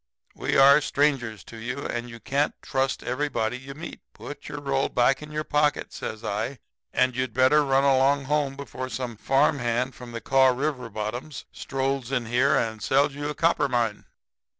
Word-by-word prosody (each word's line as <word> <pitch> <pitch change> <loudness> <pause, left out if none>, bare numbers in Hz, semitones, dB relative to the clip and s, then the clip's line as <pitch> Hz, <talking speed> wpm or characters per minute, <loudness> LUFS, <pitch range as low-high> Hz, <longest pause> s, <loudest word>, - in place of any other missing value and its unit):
'We - - -1
are 140 +2 +7
strangers 135 -9 0
to 115 - -11
you, 125 +5 -5
and 120 0 -3
you 115 -1 -10
can't 140 +5 -1
trust 135 -1 -1
everybody 125 -3 -1
you 135 +2 -9
meet. 165 +3 -8 0.2
Put 145 - -9
your 150 - -5
roll 135 -1 0
back 125 +3 +2
in 150 0 -9
your 155 0 -2
pocket,' 150 -1 0
says 110 +1 -6
I. 115 +6 -2 0.3
'And 125 -1 +2
you'd 130 -3 -2
better 130 +4 +5
run 135 -1 +2
along 140 +1 +3
home 145 -1 0
before 130 -2 -6
some 125 -3 -4
farm 135 +6 +2
hand 125 +2 -1
from 125 -1 -10
the 115 - -5
Kaw 135 +2 +4
River 130 -1 -1
bottoms 115 +7 -5
strolls 135 -1 -2
in 125 -3 0
here 125 +5 +3
and 110 -1 -1
sells 135 +8 +2
you 145 +1 -4
a 150 - -4
copper 165 -4 +2
mine.' 115 -4 -1
135 Hz, 185 wpm, -25 LUFS, 120-140 Hz, 0.3 s, are